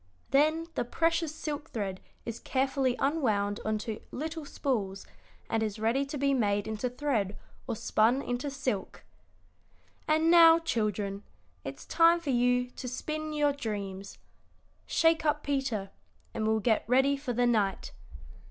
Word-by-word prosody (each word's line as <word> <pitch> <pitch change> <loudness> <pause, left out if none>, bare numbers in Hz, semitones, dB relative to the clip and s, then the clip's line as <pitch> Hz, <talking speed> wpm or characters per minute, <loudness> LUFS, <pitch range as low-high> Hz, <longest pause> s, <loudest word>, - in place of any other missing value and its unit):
Then 310 +4 +3
the - - -1
precious 330 +4 0
silk 300 0 -5
thread 195 -4 -4 0.2
is 230 -1 -5
carefully 265 -1 0
unwound 215 -9 0
on 215 0 0
to 220 -2 -4
little 320 +2 -5
spools, 210 -9 -2 0.4
and 225 - 0
is 215 -1 -2
ready 230 +6 +1
to 290 - -5
be 275 0 +2
made 205 -5 +1
into 220 +3 -2
thread 240 -7 -1 0.3
or 235 - -2
spun 225 +4 +2
into 245 +4 -2
silk. 260 -8 -3 1.0
"And 315 +2 +3
now, 330 -1 +8
children, 210 - -2 0.4
it's - - -7
time 335 0 +5
for 310 -5 -2
you 245 0 +2
to 250 - -7
spin 310 +5 -4
your 295 -1 +2
dreams. 200 -7 -5 0.7
Shake 325 0 +3
up 300 -1 +1
Peter, 255 -9 -2 0.4
and 215 - -1
we'll 220 0 +2
get 220 0 +2
ready 265 +3 +4
for 275 -3 -4
the 245 +1 +2
night. 210 -5 +1
250 Hz, 145 wpm, -29 LUFS, 215-295 Hz, 1.0 s, now